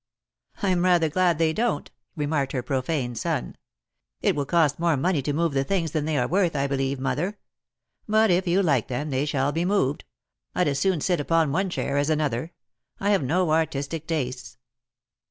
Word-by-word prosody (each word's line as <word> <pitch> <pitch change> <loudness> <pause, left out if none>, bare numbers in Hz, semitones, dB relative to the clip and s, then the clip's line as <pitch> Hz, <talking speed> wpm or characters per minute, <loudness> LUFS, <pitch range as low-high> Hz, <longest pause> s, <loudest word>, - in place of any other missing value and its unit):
"I'm 185 -3 +2
rather 175 -3 +3
glad 175 0 +2
they 160 0 +2
don't," 235 +6 -1 0.2
remarked 145 -3 -1
her 130 -3 -2
profane 130 0 -1
son. - - -3 0.6
"It - - +1
will 140 -2 -2
cost 160 -4 +2
more 170 -3 +2
money 170 +1 +1
to 145 - -2
move 165 +1 0
the 135 0 +1
things 170 -1 -1
than 155 -2 -1
they 155 -1 0
are 125 - +1
worth, 180 -3 +1
I 140 -1 +1
believe, 135 -1 -1
mother; 165 +10 -2 0.7
but 215 -1 +4
if 180 +2 +2
you 185 +3 +3
like 140 - +2
them, 140 +4 -3
they 135 +2 0
shall 140 -1 0
be 165 +3 -1
moved. 180 -7 0 0.5
I'd 180 - +2
as 140 -1 -1
soon 185 -1 +1
sit 180 0 +1
upon 160 0 +2
one 190 +5 0
chair 140 -5 -2
as 145 +2 +1
another. 150 -1 -1 0.5
I 200 +1 +1
have 200 - +3
no 170 +8 +1
artisti 155 -1 0
Tj 155 - -29
tastes." 125 -8 -3
155 Hz, 190 wpm, -25 LUFS, 140-175 Hz, 0.7 s, but